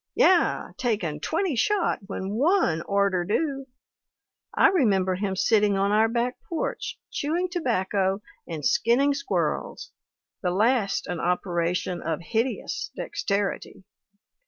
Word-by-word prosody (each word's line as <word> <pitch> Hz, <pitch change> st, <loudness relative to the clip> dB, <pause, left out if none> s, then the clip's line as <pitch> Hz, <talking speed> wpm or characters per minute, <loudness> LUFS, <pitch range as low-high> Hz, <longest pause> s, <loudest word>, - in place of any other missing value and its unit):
'Yeh 365 Hz, -2 st, +3 dB
taken 200 Hz, -11 st, -1 dB
twenty 325 Hz, -, -1 dB
shot 405 Hz, -, +1 dB
when 195 Hz, -1 st, -4 dB
one 255 Hz, -, +2 dB
orter 200 Hz, -3 st, +2 dB
do.' 275 Hz, -, -1 dB, 0.8 s
I 410 Hz, -, +5 dB
remember 200 Hz, -, +2 dB
him 190 Hz, +1 st, -2 dB
sitting 205 Hz, 0 st, +3 dB
on 200 Hz, +1 st, +1 dB
our 215 Hz, +1 st, +4 dB
back 240 Hz, +2 st, -1 dB
porch, 335 Hz, -3 st, -3 dB
chewing 335 Hz, +5 st, -1 dB
tobacco, 200 Hz, -, 0 dB, 0.2 s
and 155 Hz, -4 st, -5 dB
skinning 270 Hz, +5 st, +3 dB
squirrels, 330 Hz, +6 st, -2 dB, 0.5 s
the 180 Hz, -, 0 dB
last 210 Hz, +2 st, +1 dB
an 175 Hz, -2 st, -4 dB
operation 175 Hz, 0 st, -1 dB
of 160 Hz, 0 st, -2 dB
hideous 225 Hz, +8 st, -2 dB
dexterity. 200 Hz, -, -3 dB
210 Hz, 115 wpm, -25 LUFS, 185-275 Hz, 0.8 s, I